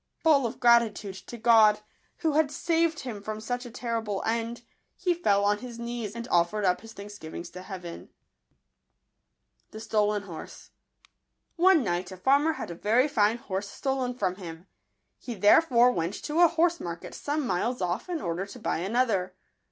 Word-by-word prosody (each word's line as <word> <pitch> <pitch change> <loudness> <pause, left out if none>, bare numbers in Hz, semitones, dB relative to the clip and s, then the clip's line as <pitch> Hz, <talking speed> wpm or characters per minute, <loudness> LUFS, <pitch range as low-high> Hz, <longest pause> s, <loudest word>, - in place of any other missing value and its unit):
Full 290 -6 +4
of 225 - -8
gratitude 235 -4 +3
to 240 - -7
God, 220 -2 +5 0.4
who 320 -2 +2
had 305 0 +2
saved 330 +1 0
him 230 -6 -6
from 215 +1 -5
such 245 +3 -4
a - - -9
terrible 230 -4 -3
end, 230 +1 -2 0.3
he 360 -2 0
fell 200 -13 +2
on 205 0 +2
his 240 0 -8
knees, 235 -2 -5
and 235 +1 -6
offered 175 +4 +2
up 180 -1 +2
his 225 0 -11
thanksgivings 200 -5 -9
to 180 - -9
Heaven. 185 -3 -8 1.6
jbtolen 210 -2 -1
$?or*e. 165 -3 -7 1.3
■ - - +6
NE 290 - 0
night 175 -1 -2
a 185 - -8
farmer 280 - +3
had 240 - -6
a - - -4
very 225 - +2
fine 220 -5 +2
horse 200 -3 -4
stolen 265 -2 -2
from 185 -7 -1
him. 170 -2 -9 0.5
He 240 - -6
there 205 +8 +6
fore 250 -6 +4
went 170 -3 -2
to 310 +2 -1
a 340 - +7
liorse 340 +1 +2
market 170 -1 -6
some 290 0 -2
miles 230 +5 -1
off, 180 - -2
in 340 -4 -2
order 170 +3 -3
to 205 - -10
buy 230 - -2
another. 195 -2 0
225 Hz, 175 wpm, -27 LUFS, 195-255 Hz, 1.6 s, a